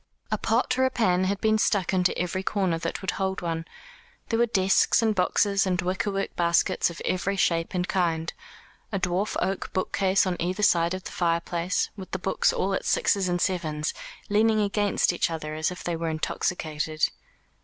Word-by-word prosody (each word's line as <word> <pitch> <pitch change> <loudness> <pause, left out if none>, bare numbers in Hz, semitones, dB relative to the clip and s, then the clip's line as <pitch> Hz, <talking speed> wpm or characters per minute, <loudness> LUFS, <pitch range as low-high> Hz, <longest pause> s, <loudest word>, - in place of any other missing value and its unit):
A - - +1
pot 255 0 +1
or - - +4
a 260 - +4
pan 185 -7 +1
had 195 +1 -1
been 220 0 +3
stuck 195 -4 +1
into 180 -1 +2
every 180 +1 -1
corner 190 -4 0
that 165 0 -4
would 190 - 0
hold 190 0 -2
one. 165 -1 -3 0.6
There 225 - +1
were 235 - +4
desks, 195 +2 +3
and 220 -1 +3
boxes, 200 +1 +2
and 180 -1 0
wickerwork 195 +2 -2
baskets 170 0 +2
of 170 - -8
every 190 +2 0
shape 170 -2 0
and 180 0 0
kind, 165 -3 0 0.6
a 200 - 0
dwarf 185 +3 -1
oak 195 0 -2
bookcase 190 +1 +1
on 180 -2 -1
either 185 +4 -1
side 170 -2 +3
of 185 - -7
the - - -7
fireplace, 170 +1 0
with 190 -3 -9
the - - +1
books 190 +1 +1
all 195 +1 -1
at - - -1
sixes 195 -2 +1
and 175 0 0
sevens, 155 -5 -1 0.3
leaning 215 +1 +3
against 205 -3 +1
each 175 - 0
other 155 -2 -5
as 155 0 0
if 180 - -8
they 175 - -2
were 165 0 -2
intoxicated. 155 -1 -1
185 Hz, 185 wpm, -26 LUFS, 170-195 Hz, 0.6 s, or